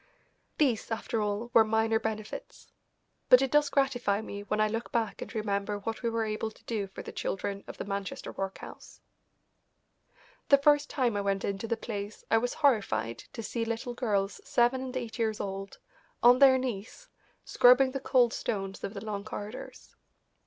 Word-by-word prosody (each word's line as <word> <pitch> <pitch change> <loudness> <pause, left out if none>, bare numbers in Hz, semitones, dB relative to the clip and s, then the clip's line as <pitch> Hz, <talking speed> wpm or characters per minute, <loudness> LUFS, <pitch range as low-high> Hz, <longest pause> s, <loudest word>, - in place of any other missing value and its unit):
These, 255 -8 +1
after 225 0 -2
all, 210 +3 -2
were 225 - +8
minor 220 0 +2
benefits. 215 -1 -6 0.6
But 250 +1 +8
it 270 - -1
does 295 -1 +4
gratify 260 -7 +1
me 200 -2 -6
when 210 +1 -2
I 215 - +4
look 225 +2 -4
back 230 -3 -1
and - - -6
remember 205 -1 -1
what 225 +2 -5
we 235 - 0
were 230 -1 -1
able 215 +1 -2
to 220 - -20
do 210 -4 -2
for 190 - -9
the - - -7
children 200 0 -3
of - - -8
the - - -5
Manchester 200 0 -4
workhouse. 195 0 -7 1.5
The 280 - +8
first 290 +1 +3
time 250 -6 0
I 205 - 0
went 195 -1 -1
into 200 +3 -3
the 230 - -1
place 210 -2 -6
I 225 - +5
was 245 +2 -2
horrified 215 - +1
to 230 - -6
see 230 +2 -2
little 230 +2 -3
girls 205 -5 -1
seven 245 +2 +2
and 260 0 -4
eight 235 -2 -5
years 220 -2 0
old 195 0 -5 0.5
on 245 +1 +7
their 270 -2 +7
knees 255 - -5 0.4
scrubbing 250 +2 +5
the 270 - -3
cold 250 -3 +3
stones 195 -2 -3
of 200 - -5
the - - -6
long 205 -2 -4
corridors. 215 +2 -8
225 Hz, 180 wpm, -29 LUFS, 205-245 Hz, 1.5 s, were